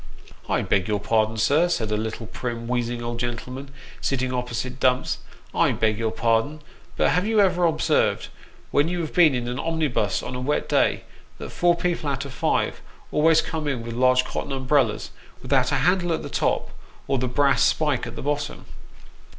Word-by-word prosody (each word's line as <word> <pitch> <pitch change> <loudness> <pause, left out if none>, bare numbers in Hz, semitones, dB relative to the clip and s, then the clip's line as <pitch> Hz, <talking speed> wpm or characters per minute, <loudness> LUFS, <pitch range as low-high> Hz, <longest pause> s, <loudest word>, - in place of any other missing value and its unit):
" - - -20
I - - +1
beg 95 -2 +1
your 105 -1 0
pardon, 110 +1 +1
sir," 150 +10 +3
said 110 -10 -1
a - - +2
little 110 +1 -4
prim, 115 +1 -5
wheezing 120 -1 -2
old 120 0 -4
gentle 120 +1 -4
man, 135 +2 -7 0.3
sitting 130 -1 -1
opposite 125 +1 -3
Dumps, 125 0 +1 0.2
" - - -27
I - - +3
beg 110 -1 0
your 115 -1 0
pardon; 115 +7 0 0.4
but - - +3
have 180 +3 +1
you 220 -1 +2
ever 180 -3 +3
observed, 160 -2 +1 0.4
when 145 +2 +3
you 175 0 -2
have 160 - -5
been 160 -6 +5
in 120 -1 -2
an 125 +1 -3
omnibus 150 - 0
on - - -5
a 125 - -4
wet 145 +4 -1
day, - - +2 0.3
that - - -8
four 175 0 +3
people 170 -3 -1
out 140 0 -2
of 140 - -8
five - - 0 0.3
always 160 +1 +4
come 160 -2 -4
in 130 -5 -2
with 115 0 -6
large 130 +1 +3
cotton 145 - -4
umbrellas, 135 +1 +1 0.3
without 130 0 +2
a - - +2
handle 175 +4 +2
at - - -3
the - - -6
top, - - 0 0.4
or 135 - +1
the 130 - 0
brass 135 0 +2
spike 150 -6 +2
at 120 - -8
the - - -6
bottom 145 +1 -3
130 Hz, 200 wpm, -24 LUFS, 120-150 Hz, 0.4 s, been